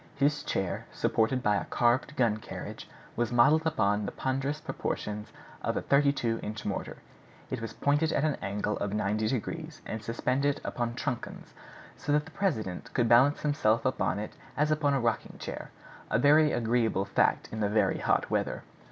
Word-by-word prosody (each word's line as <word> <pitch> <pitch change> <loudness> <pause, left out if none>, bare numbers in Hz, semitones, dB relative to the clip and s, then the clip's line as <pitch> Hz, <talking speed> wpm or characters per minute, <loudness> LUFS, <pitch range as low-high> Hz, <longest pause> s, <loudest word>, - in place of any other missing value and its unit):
His 145 +2 +2
chair, 95 -2 -2
supported 125 +3 +1
by 105 -2 +3
a - - -3
carved 125 +5 +1
gun 115 -4 +2
carriage, 110 - -8 0.3
was 120 0 0
modeled 150 +7 +5
upon 105 -9 +1
the - - -3
ponderous 135 +3 -2
proportions 105 -7 -4 0.3
of - - -1
a - - 0
32 140 -5 +2
inch 105 0 -6
mortar. 100 - -3 0.5
It 130 - -2
was 115 -1 -5
pointed 145 +3 +1
at 140 - +1
an 155 -1 +2
angle 105 +1 -2
of 100 0 -2
ninety 105 +1 0
degrees, 155 +7 -3
and 110 - -4
suspended 130 +5 0
upon 120 -1 -2
truncheons, 130 -1 -5 0.4
so - - -3
that 150 0 +2
the 160 - -12
president 110 - -2
could 120 -2 +3
balance 130 +6 +5
himself 140 -7 +2
upon 130 -6 +1
it 105 +1 -5 0.2
as 150 +1 +2
upon 145 -2 +2
a - - +2
rocking 115 -2 -1
chair, - - -6 0.4
a - - +2
very 150 +2 +5
agreeable 115 -4 +1
fact - - +2
in 110 - -4
the 105 -1 +1
very 105 +1 +2
hot - - +1
weather. - - -1
120 Hz, 175 wpm, -29 LUFS, 110-145 Hz, 0.5 s, modeled